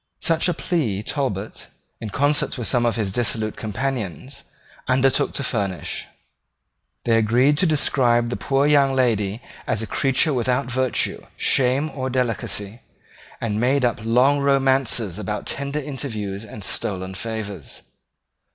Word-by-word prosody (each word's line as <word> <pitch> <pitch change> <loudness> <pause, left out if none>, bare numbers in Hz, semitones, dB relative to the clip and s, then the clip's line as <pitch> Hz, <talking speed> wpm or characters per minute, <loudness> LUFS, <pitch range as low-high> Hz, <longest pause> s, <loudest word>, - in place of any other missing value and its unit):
Such 165 +1 +2
a 175 - 0
plea 120 - -1
Talbot, 110 -7 -3 0.3
in 110 - -5
concert 145 +3 +1
with 120 - -2
some 120 -2 +2
of 115 - 0
his 105 -4 -1
dissolute 110 -1 -1
companions, 120 - -4 0.5
undertook 130 +1 +2
to 140 - -3
furnish. 100 -7 -3 1.0
They 115 -1 +3
agreed 125 +6 +3
to 185 - +4
describe 120 -6 +3
the - - -2
poor 135 0 +1
young 140 -2 +4
lady 110 -4 +1 0.3
as 110 - 0
a - - -2
creature 135 +6 +1
without 125 +2 +1
virtue, 130 0 -1
shame, 135 +4 +2
or 130 -1 -3
delicacy, 115 -4 -2 0.6
and 105 -2 -2
made 130 +1 +3
up 120 -3 0
long 125 +5 +3
romances 135 -8 +2
about 105 0 -4
tender 140 +1 -3
interviews 110 -9 -4
and 105 -1 -10
stolen 95 -1 -2
favours. 105 - -6
125 Hz, 135 wpm, -22 LUFS, 110-135 Hz, 1.0 s, to